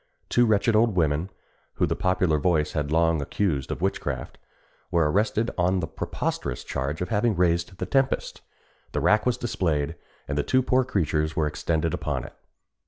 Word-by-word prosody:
Two 120 -1 +4
wretched 110 +1 +3
old 110 -2 +3
women, 80 +1 +1 0.5
whom - - +1
the - - -1
popular 90 -4 +1
voice 75 -1 +1
had 75 -1 -2
long 80 -1 +3
accused 70 -3 -1
of 85 - -4
witchcraft, 70 -9 -3 0.5
were 80 -3 +2
arrested 105 +4 +1
on 90 +2 +2
the 85 - -1
preposterous 65 -4 -3
charge 70 +5 -3
of 90 - -5
having 110 0 +1
raised 85 +1 +1
the - - -3
tempest. 135 -1 0 0.5
The 75 - 0
rack 105 - +3
was 125 -1 +2
displayed, 80 - -1 0.3
and 70 +1 -1
the - - +1
two 130 - +2
poor 130 +1 +3
creatures 80 - 0
were 80 - +1
extended 80 +1 -1
upon - - -2
it. - - -10
85 Hz, 170 wpm, -25 LUFS, 75-105 Hz, 0.5 s, Two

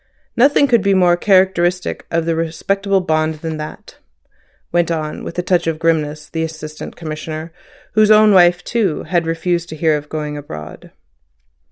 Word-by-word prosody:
Nothing 280 +3 +4
could 235 -4 +3
be 195 0 +2
more 180 -2 +4
characteristic 185 -2 +1
of 165 -1 0
the 165 0 0
respectable 195 +5 -1
bond 155 -2 0
than 160 0 -5
that," 155 0 -9 0.7
went 175 -1 +1
on, 155 -2 -3
with - - -7
a 180 - -1
touch 175 -2 +1
of 165 -1 -1
grimness, 155 -2 -1
the 160 - -4
Assistant 155 -1 -6
Commissioner, 155 0 -6 0.4
whose 215 0 +4
own 215 -1 +6
wife 175 -1 +5
too 205 -10 -1
had 170 -2 -1
refused 170 +1 -1
to 155 - -7
hear 155 0 +2
of 150 0 -6
going 150 -1 -4
abroad. 75 - -9
165 Hz, 165 wpm, -18 LUFS, 155-185 Hz, 0.7 s, own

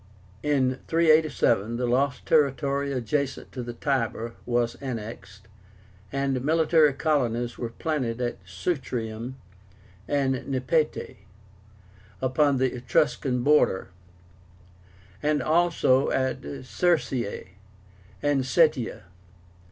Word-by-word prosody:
In 130 -2 +1
387 155 -9 +3
the 125 - -1
lost 130 +2 0
territory 140 -1 +2
adjacent 135 +2 -2
to 125 - -5
the 120 0 -6
Tiber 115 -4 -1
was 120 -1 +1
annexed, 110 -5 -7 0.6
and 135 -2 -1
military 160 0 +4
colonies 120 -6 0
were 120 - -3
planted 125 -4 -2
at 120 -5 -2
Sutrium 115 - -4 0.7
and 135 -3 0
Nepete 140 +3 -1 1.0
upon 135 +2 +2
the 130 0 +1
Etruscan 125 0 0
border, 145 -11 +3 1.3
and 150 0 +1
also 160 -5 +3
at 130 0 0 0.2
Circeii 130 - 0 0.7
and 145 -2 +2
Setia. 135 - +2
130 Hz, 90 wpm, -26 LUFS, 120-150 Hz, 1.3 s, military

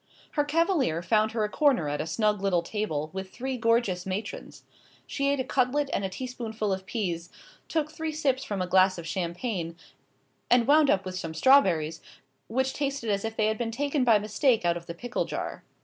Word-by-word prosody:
Her 295 - +1
cavalier 290 - +1
found 215 +4 +2
her 225 -2 0
a - - +1
corner 265 - +2
at 145 0 -2
a 155 - -4
snug 210 +3 +1
little 185 -4 +1
table 160 -6 -3
with 190 0 -5
three 260 +5 -4
gorgeous 230 -6 +1
matrons. 195 +3 -5 0.4
She 280 0 -1
ate 280 -1 +1
a - - +1
cutlet 270 +3 +1
and - - 0
a 190 - -1
teaspoonful 220 -2 -3
of 190 0 -5
peas, 175 -7 -3 0.4
took 305 -2 -1
three 320 0 -3
sips 285 -4 0
from 200 -3 -2
a - - -4
glass 185 0 +4
of 170 - -7
champagne, 170 +1 -3 0.7
and 245 -1 +5
wound 295 0 +5
up 190 0 +2
with 185 0 -4
some 165 -3 -5
strawberries, 165 - +4 0.5
which 265 +3 0
tasted 275 -6 -2
as 200 -1 0
if 225 0 -4
they 215 - +3
had 220 0 0
been 235 -1 -1
taken 280 +4 0
by 230 -3 +6
mistake 215 +2 +1
out 170 0 +3
of 170 0 -8
the 170 - -6
pickle 245 +7 -2
jar. - - -5
215 Hz, 200 wpm, -27 LUFS, 185-260 Hz, 0.7 s, by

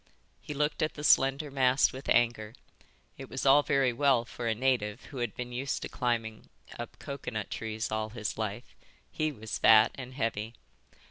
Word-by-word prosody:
He 150 - -7
looked 150 +1 0
at 155 - 0
the 150 - -7
slender 140 +1 +3
mast 130 0 +3
with 130 +1 -8
anger. 115 -2 +2 0.6
It 135 - -8
was 135 - -4
all 140 +2 +7
very 135 -3 +2
well 130 -2 +3
for 120 0 -6
a 110 - +1
native 120 -3 0
who - - -6
had 120 -5 -3
been 125 0 -5
used 135 +3 -3
to - - -5
climbing 115 -4 -2 0.3
up 120 - -7
coconut 125 -7 -5
trees 110 0 -4
all 110 0 -2
his 110 -2 -4
life. 110 +2 -5 0.4
He 155 0 -1
was 110 -5 -6
fat 110 -1 +7
and 130 -1 -9
heavy. 115 -2 -2
125 Hz, 180 wpm, -30 LUFS, 110-135 Hz, 0.6 s, all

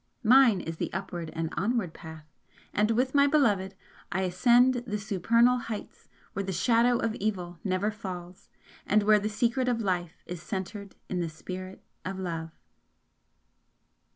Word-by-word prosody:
Mine 240 -4 +6
is 165 0 -6
the - - -3
upward 175 -3 -4
and 165 0 -3
onward 205 -3 0
path 160 -1 -10 0.5
and 210 +1 +2
with 250 +3 +1
my 280 0 +5
Beloved 205 -10 +2 0.4
I 190 - 0
ascend 240 +7 +4
the 210 -1 -1
supernal 230 +5 +3
heights 225 -3 -7 0.2
where 200 - -2
the 195 -1 -3
Shadow 235 +7 +3
of 230 -1 -1
Evil 180 -6 -3
never 195 +2 0
falls, 185 -3 -8 0.4
and 210 0 +3
where 210 0 +5
the 210 +1 -2
Secret 235 +4 0
of 245 -2 +1
Life 180 -5 -2
is 175 -1 -7
centred 200 +1 -6
in 180 - -2
the 170 -2 -1
Spirit 185 +4 -8 0.2
of 190 +1 -4
Love. 165 -3 -4
200 Hz, 155 wpm, -28 LUFS, 180-230 Hz, 0.5 s, Mine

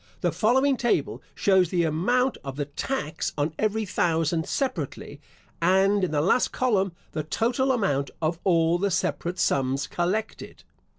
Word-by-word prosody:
The - - +1
following 265 +5 +2
table 240 - 0
shows 190 -3 +3
the 175 -1 +1
amount 240 +12 +1
of 135 -1 -6
the 145 0 -2
tax 155 - -3
on 150 +2 -1
every 215 0 0
thousand 165 -3 0
separately, 155 - -3 0.4
and 190 +3 +3
in 185 - +1
the 150 -1 0
last 190 +10 +2
column 195 -8 +1 0.2
the 155 - -2
total 240 - 0
amount 145 - 0
of 165 +1 -1
all 170 -2 +3
the 200 +2 +1
separate 180 -1 -2
sums 135 0 +1
collected. 185 +9 -3
180 Hz, 145 wpm, -25 LUFS, 155-220 Hz, 0.4 s, shows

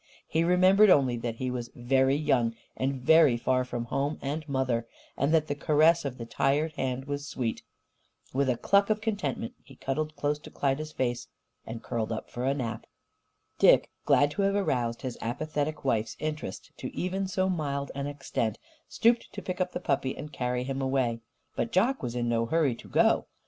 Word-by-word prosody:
He 160 - +1
remembered 185 +4 +5
only 135 -7 +5
that 115 -1 -3
he 130 +2 -3
was 120 -2 -4
very 130 +2 +2
young 120 -6 +1 0.2
and 135 +1 -1
very 150 -1 +5
far 130 +2 +1
from 120 -2 -4
home 140 +5 -1
and 150 +2 -4
mother, 125 -4 0 0.3
and 140 +3 +1
that 160 -2 +4
the 145 - -2
caress 155 +3 +3
of 130 -2 -4
the 115 - -6
tired 145 +6 +1
hand 130 -2 -2
was 145 0 -4
sweet. 120 -5 -3 0.7
With 135 0 +1
a 125 - +1
cluck 200 - +3
of 215 0 +2
contentment, 225 +2 -2
he 135 - -15
cuddled 155 +4 -3
close 145 +1 -1
to - - -12
Klyda's 145 +3 -1
face 120 -2 -2 0.4
and 115 0 -6
curled 115 -1 -2
up 110 - -5
for 120 +1 -3
a 135 +1 +2
nap. 115 -5 -4 0.7
Dick, - - +5
glad 145 0 +4
to 200 - -2
have 195 0 +2
aroused 120 -12 0
his 125 -3 -5
apathetic 150 +5 -3
wife's 115 -4 0
interest 155 -10 -5
to - - -5
even 190 +2 -1
so 185 0 0
mild 140 -6 -2
an 140 0 -3
extent, 135 -6 -2 0.3
stooped 235 +1 +2
to - - -6
pick 185 0 -3
up 180 0 0
the - - -4
puppy 135 -1 -1
and 150 0 -8
carry 125 -1 -1
him 135 +1 -3
away. 130 -3 0 0.4
But 230 - -1
Jock 235 +6 +2
was 120 -1 -4
in 120 -1 -1
no 115 -1 +1
hurry 150 -1 +2
to 115 - -12
go. - - +3
140 Hz, 190 wpm, -28 LUFS, 125-155 Hz, 0.7 s, remembered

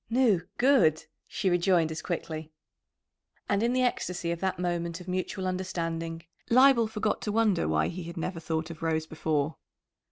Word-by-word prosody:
"Nu, 230 -7 +3 0.2
good!" 245 - +4 0.2
she 200 - -2
rejoined 175 -2 +3
as 160 - -4
quickly. 160 -3 -4 1.0
And 200 0 +1
in 235 +1 +2
the 255 0 +2
ecstasy 180 -8 -1
of 170 - -3
that 190 0 -1
moment 170 -1 -2
of 180 - -11
mutual 185 +1 -2
understanding 165 -3 -3 0.3
Leibel 255 -1 +6
forgot 215 -1 -1
to 210 - -2
wonder 210 -5 +2
why 80 0 +2
he 180 +1 -5
had 170 +1 -8
never 170 +1 -3
thought 160 0 -3
of 160 - -11
Rose 160 -1 0
before. 155 -1 -1
175 Hz, 165 wpm, -28 LUFS, 165-205 Hz, 1.0 s, Leibel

